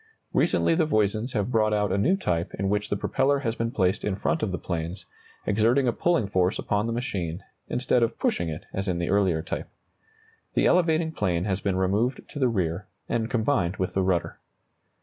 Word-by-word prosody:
Recently - - +3
the 160 -2 +2
Voisins 110 0 +1
have 105 0 -1
brought 110 -2 +2
out 105 -2 +1
a 95 - +1
new 185 - +3
type 85 - -1
in 95 0 -1
which 105 0 0
the 100 - 0
propeller 140 +6 +1
has 115 -4 -1
been 115 0 -2
placed 95 -6 0
in 105 - 0
front 165 - -1
of 100 - -1
the 90 - -2
planes, 85 +1 -4 0.4
exerting 115 +6 +3
a 120 - +2
pulling 170 -6 +1
force 95 -1 +1
upon 105 +2 0
the - - -1
machine, 95 -8 -3 0.2
instead 125 0 +1
of 115 0 0
pushing 85 -1 0
it 80 0 -6
as 95 +1 -2
in 90 -2 0
the 85 +1 -1
earlier 95 -6 +2
type. - - -5 0.9
The - - +3
elevating 165 -2 +3
plane 90 - 0
has 100 -1 -1
been 100 -2 0
removed 100 +7 0
to 145 - -7
the 130 -3 +3
rear, 95 -3 -1 0.2
and 115 -1 -1
combined 110 -7 +1
with 95 - -2
the 95 - +1
rudder. 90 -3 0
105 Hz, 205 wpm, -26 LUFS, 95-125 Hz, 0.9 s, Recently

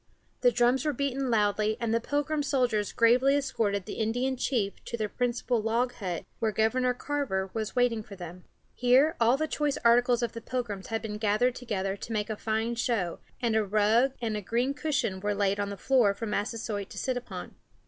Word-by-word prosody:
The 245 - +4
drums 245 +2 +2
were 300 - 0
beaten 275 0 -1
loudly, 215 -1 +2
and 230 -1 -1
the 230 - +3
Pilgrim 290 +3 -1
soldiers 250 -7 +1
gravely 250 +4 +4
escorted 205 -8 0
the - - -6
Indian 245 +4 0
chief 235 -6 -1
to 235 - -4
their 215 -2 -1
principal 245 0 -1
log 235 +3 0
hut, 180 -6 -4
where 220 -1 +1
Governor 250 +4 +1
Carver 245 -10 -2
was 220 0 -3
waiting 245 -3 +2
for 210 -1 -11
them. 180 -1 -9 0.3
Here 255 +6 +4
all 235 +3 +5
the 315 +2 -1
choice 295 -2 -1
articles 240 +1 +4
of 235 - -1
the 230 - -8
Pilgrims 220 -6 -4
had 225 -1 -3
been 210 -1 -5
gathered 215 +4 +2
together 195 -6 -3
to 225 +3 -7
make 210 0 -1
a - - -2
fine 220 +2 -1
show, 230 -7 -1 0.2
and 230 -2 +2
a 220 - +3
rug 215 +6 +3
and 215 -2 -2
green 240 +7 0
cushion 280 -10 -1
were 205 +1 -1
laid 200 0 +1
on 205 0 -1
the 200 - -6
floor 240 -6 +3
for 225 - -5
Massasoit 210 -1 -3
to - - -11
sit 255 - -1
upon. 245 - -6
230 Hz, 200 wpm, -28 LUFS, 210-250 Hz, 0.3 s, all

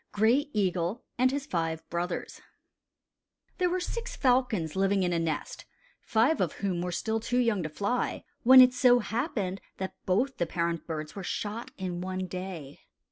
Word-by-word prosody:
GRAY 240 +8 +3
EAGLE 185 -1 -1 0.2
AND 255 +1 +5
HIS 280 +1 -3
FIVE 165 - -2
BROTHERS 175 +1 -3 1.2
|THERE 360 -1 +3
were 365 +1 0
six 460 +6 -4
falcons 245 - +1
living 195 0 +2
in 175 -1 +1
a 170 - +1
nest, 160 -2 -3 0.4
five 235 +7 +2
of 175 -5 0
whom 185 -3 -2
were 180 0 -2
still 220 +5 -1
too 245 +2 -1
young 230 -6 +2
to 155 - -3
fly, 205 +10 -2 0.2
when 260 +2 +9
it 250 0 +7
so 250 -1 +5
happened 215 - -2 0.2
that 190 -1 -4
both 240 +9 +1
the 170 - 0
parent 170 -1 -2
birds 155 -2 -5
were 200 - -5
shot 210 +5 -4
in 180 -2 -4
one 185 0 -3
day. 180 -6 -7
195 Hz, 170 wpm, -29 LUFS, 175-245 Hz, 1.2 s, when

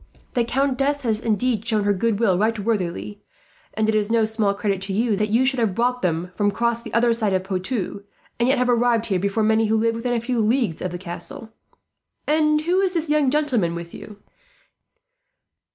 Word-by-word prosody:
The 240 - +2
countess 275 +3 0
has 225 -4 0
indeed 225 0 0
shown 220 -3 +1
her 205 0 +2
goodwill 210 -1 +1
right 220 +4 +1
worthily, 180 - -3 0.5
and 220 0 +1
it 220 - +2
is 210 -1 +1
no 225 -1 +3
small 215 -2 0
credit 200 -2 -1
to 195 0 -4
you 220 +1 +1
that 210 +1 -1
you 235 +5 +3
should 260 -1 +1
have 215 -5 0
brought 250 +1 0
them 175 0 -1
across 230 +3 +1
from 235 - -9
the - - 0
other 235 0 +3
side 215 -4 0
of 185 - -1
Poitou, 195 +2 -3 0.4
and 240 +2 +2
yet 275 - +3
have 250 0 +1
arrived 240 -1 +2
here 190 -4 0
before 200 +3 0
many 220 +1 +3
who 220 +1 +2
live 230 +1 +1
within 235 +2 -2
a 235 - +1
few 240 +1 -2
leagues 225 - +1
of 185 - -2
the 175 - -5
castle. 180 +5 -8 0.7
"And 305 0 +2
who 350 +4 +1
is 380 -2 0
this 325 -2 -1
young 300 -3 +3
gentleman 255 - +1
with 170 0 -8
you?" 210 - -10
225 Hz, 205 wpm, -22 LUFS, 200-245 Hz, 0.7 s, no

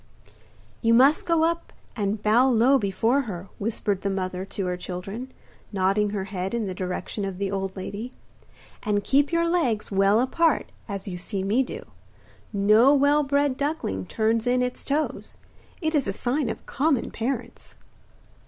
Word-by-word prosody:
'You 230 0 +4
must 275 +6 +5
go 335 -2 +3
up 335 +1 -1 0.2
and 205 -1 -2
bow 235 +5 +4
low 255 +3 +4
before 225 +7 +1
her,' 180 0 -6
whispered 205 -2 -1
the 200 - -1
mother 185 -1 -3
to 195 0 -4
her 180 0 -1
children, 195 +8 -6 0.4
nodding 200 +1 +1
her 200 -2 -2
head 190 +1 -4
in 230 -2 -1
the 190 - -3
direction 185 +3 -4
of 195 -2 -4
the 195 0 -2
old 195 -1 -3
lady, 205 +6 -5 0.7
'and 205 -1 0
keep 275 +7 +2
your 335 0 +2
legs 255 -14 0
well 195 +2 +4
apart, 310 +5 +1 0.2
as 200 -1 -5
you 180 -2 -4
see 190 +2 -4
me 210 +7 +2
do. 445 - -5 0.7
No 215 +7 +5
well 285 +2 +4
bred 280 -1 +1
duckling 280 - -2
turns 225 +1 0
in 250 0 +3
its 250 0 -4
toes. 300 +2 -2 0.5
It 315 0 0
is 290 -7 +1
a 195 - -1
sign 255 +4 -1
of - - -6
common 280 -2 0
parents. 245 +1 -4
220 Hz, 165 wpm, -25 LUFS, 195-270 Hz, 0.7 s, must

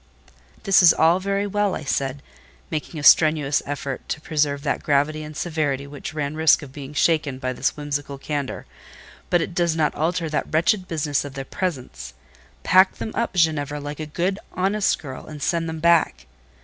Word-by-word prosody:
"This 195 -2 +5
is 170 -2 +8
all 165 +3 +4
very 200 +1 -1
well," 205 -1 0
I - - -6
said, 140 0 -2 0.5
making 155 +1 -4
a - - -6
strenuous 150 -2 +5
effort 140 -2 -5
to - - -2
preserve 145 -2 -1
that - - -1
gravity 150 +2 +1
and 155 0 -8
severity 145 -5 -1
which 145 +2 -8
ran 145 -1 -2
risk 160 0 +4
of 135 -2 -11
being 145 0 -9
shaken 155 -4 +1
by 130 -1 -3
this - - -1
whimsical 145 -1 -4
candour, 145 -1 -4 0.6
"but 175 - +3
it 170 - -6
does 170 -2 +1
not 155 -2 +1
alter 165 +2 -1
that 155 - -3
wretched 180 +4 +2
business 150 -3 -1
of 140 -1 -8
the 135 0 -5
presents. 130 - -5 0.5
Pack 185 +1 +5
them 220 - -5
up, 235 -4 -2
Ginevra, 150 -4 +1
like 145 +1 -7
a 155 - -4
good, 180 +6 -1
honest 195 +2 +1
girl, 130 -5 -9
and 155 -1 -8
send 165 +3 -1
them 160 - -5
back." 160 - +2
155 Hz, 185 wpm, -23 LUFS, 145-170 Hz, 0.6 s, is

